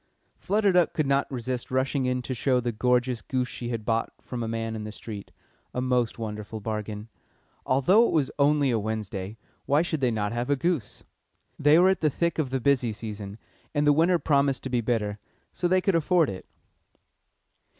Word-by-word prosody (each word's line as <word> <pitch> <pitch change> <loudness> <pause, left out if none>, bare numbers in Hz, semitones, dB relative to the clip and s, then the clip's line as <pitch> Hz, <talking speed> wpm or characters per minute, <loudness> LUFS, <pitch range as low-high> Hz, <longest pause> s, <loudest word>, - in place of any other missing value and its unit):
Flutter 205 +1 +2
Duck 180 -2 +3
could 155 - 0
not 140 +1 +1
resist 125 -1 -4
rushing 130 +1 0
in 125 0 -1
to 130 - -3
show 125 +1 +1
the 120 -1 -1
gorgeous 125 +1 +1
goose 130 -1 -1
she 120 -1 -6
had 115 -3 -4
bought 115 -1 0
from 125 -2 -6
a 115 - -2
man 115 0 -3
in 110 - -5
the 105 - -6
street 105 -2 -8 0.5
a - - 0
most 125 -2 0
wonderful 105 -1 -5
bargain. 105 0 -4 0.6
Although 185 - +4
it - - -2
was 150 -5 +1
only 145 -1 +3
a 115 - +1
Wednesday, 105 -1 -4 0.3
why 145 +3 +3
should 160 -4 -3
they 130 - +3
not 105 -3 -1
have 120 +2 -2
a 145 - +4
goose? 140 - -2 0.6
They 145 +2 +6
were 180 +2 +6
at 190 - +1
the 155 - +3
thick 170 +3 -1
of 145 -5 0
the 130 +1 -1
busy 130 -3 +2
season, 105 -2 -7 0.4
and 145 0 +2
the 145 - +6
winter 170 +4 +4
promised 140 -3 +1
to 130 - -5
be 120 -1 +1
bitter, 110 -3 -1 0.3
so 175 - 0
they 185 +1 +3
could 195 - +1
afford 165 - +3
it. 95 - -9
125 Hz, 200 wpm, -26 LUFS, 110-145 Hz, 0.6 s, They